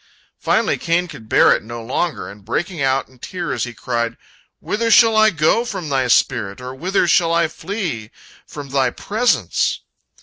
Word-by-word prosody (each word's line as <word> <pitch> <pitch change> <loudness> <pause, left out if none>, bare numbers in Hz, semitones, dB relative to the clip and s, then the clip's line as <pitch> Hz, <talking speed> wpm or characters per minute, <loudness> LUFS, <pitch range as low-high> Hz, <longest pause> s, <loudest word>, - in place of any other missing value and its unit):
Finally - - +1
Cain 175 +1 0
could 130 -9 -12
bear - - +5
it - - +2
no 120 +2 -8
longer, 150 +8 -2
and, 100 0 -12
breaking 160 - -3
out 135 0 +1
in 130 -1 -22
tears, 175 +2 -3
he 120 - -8
cried: 120 -1 -2 0.4
"Whither 230 +2 -1
shall 225 -1 +6
I 215 0 +6
go 165 +6 +2
from 180 -9 -5
Thy 135 -2 +1
spirit? 100 -4 +1
Or 125 0 -7
whither 180 +6 0
shall 170 0 +3
I 170 0 +2
flee 160 - -5 0.4
from 145 -2 -9
Thy 135 -2 +2
presence?" 220 - 0
155 Hz, 170 wpm, -19 LUFS, 125-180 Hz, 0.4 s, shall